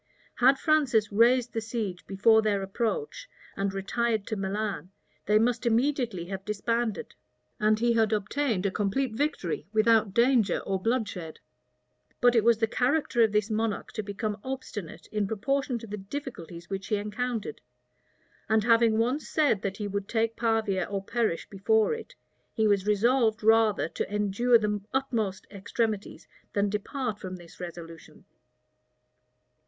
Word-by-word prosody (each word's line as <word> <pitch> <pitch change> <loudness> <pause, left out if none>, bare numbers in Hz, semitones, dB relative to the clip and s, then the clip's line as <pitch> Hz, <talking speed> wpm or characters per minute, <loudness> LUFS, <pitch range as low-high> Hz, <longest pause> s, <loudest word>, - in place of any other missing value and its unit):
Had 265 +2 +5
Francis 275 -10 +2
raised 240 +3 +3
the 225 - -1
siege 215 -5 -4
before 220 +3 +4
their 205 -2 0
approach, 345 - -3 0.3
and 195 0 -1
retired 215 +2 -1
to 220 - -3
Milan, 200 -1 -3 0.4
they 210 +1 +5
must 230 +2 +1
immediately 235 -5 0
have 195 +1 -6
disbanded; 220 +1 -2 0.5
and 215 0 +3
he 235 +1 +2
had 225 -1 +2
obtained 215 0 0
a 200 - +1
complete 220 +6 -1
victory 220 - -2
without 220 -1 +3
danger 235 -2 +3
or 190 -1 -2
bloodshed. 205 -8 -2 0.8
But 245 0 +5
it 225 - +4
was 235 -1 +4
the 225 - +2
character 250 +2 +1
of 220 -2 +4
this 210 +1 0
monarch 220 -1 -2
to 215 - -3
become 205 +1 -4
obstinate 260 -9 -6
in 210 -2 0
proportion 250 +5 -1
to 230 - -9
the 210 -1 -6
difficulties 190 - -7
which 195 -1 -5
he 215 - +1
encountered; 215 +2 -3 0.9
and 220 -1 +3
having 230 -1 +4
once 250 +7 0
said, 290 -11 +2
that 200 0 -3
he 210 - -3
would 200 0 -3
take 225 0 0
Pavia 225 -4 0
or 200 -1 -4
perish 220 -5 -1
before 215 - +2
it, 455 0 -8 0.4
he 220 -2 +2
was 200 -1 +2
resolved 220 +1 +2
rather 220 -5 +4
to - - -4
endure 210 +4 +3
the 210 -2 -1
utmost 225 -8 -1
extremities 210 +1 -3 0.3
than 205 0 +1
depart 210 +2 -3
from 185 0 -6
this 175 -2 -14
resolution. 170 -2 -10
220 Hz, 150 wpm, -28 LUFS, 200-235 Hz, 0.9 s, Had